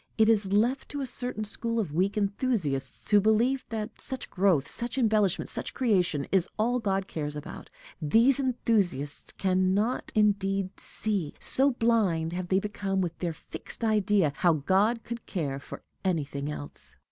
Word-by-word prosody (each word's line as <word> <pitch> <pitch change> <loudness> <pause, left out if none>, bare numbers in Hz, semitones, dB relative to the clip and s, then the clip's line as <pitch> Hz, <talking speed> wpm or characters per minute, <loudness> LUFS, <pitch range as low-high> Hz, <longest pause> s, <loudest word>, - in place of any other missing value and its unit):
It 220 0 +5
is 205 -4 +2
left 235 +7 +1
to 285 - -4
a - - -1
certain 245 -3 -3
school 230 +2 -2
of 185 -9 -2
weak 190 +5 +1
enthusiasts, 200 - -1
who 205 -1 +6
believe 235 +5 +2
that 220 -2 -4
such 260 -1 0
growth, 180 -7 +2
such 240 +2 -4
embellishment, 215 -6 +2
such - - -5
creation, 180 - +1
is 190 -2 +2
all 240 +3 +1
God 195 -3 -1
cares 150 -2 -4
about; 150 - -8 0.3
these 230 - +4
enthusiasts 200 - 0
can 185 0 +1
not 220 +5 -1
indeed 195 -2 +1
see, 200 -8 -2
so 270 +2 +2
blind 205 -9 +1
have 180 0 -3
they 190 +1 +3
become 195 -1 -2
with 175 -3 -1
their 170 -2 -2
fixed 225 - -4
idea, 205 -7 +2
how 175 +2 +4
God 195 - +2
could 235 0 -7
care 140 -7 -2
for - - -10 0.2
anything 145 -6 -1
else. 145 -1 -7
200 Hz, 160 wpm, -28 LUFS, 175-225 Hz, 0.3 s, who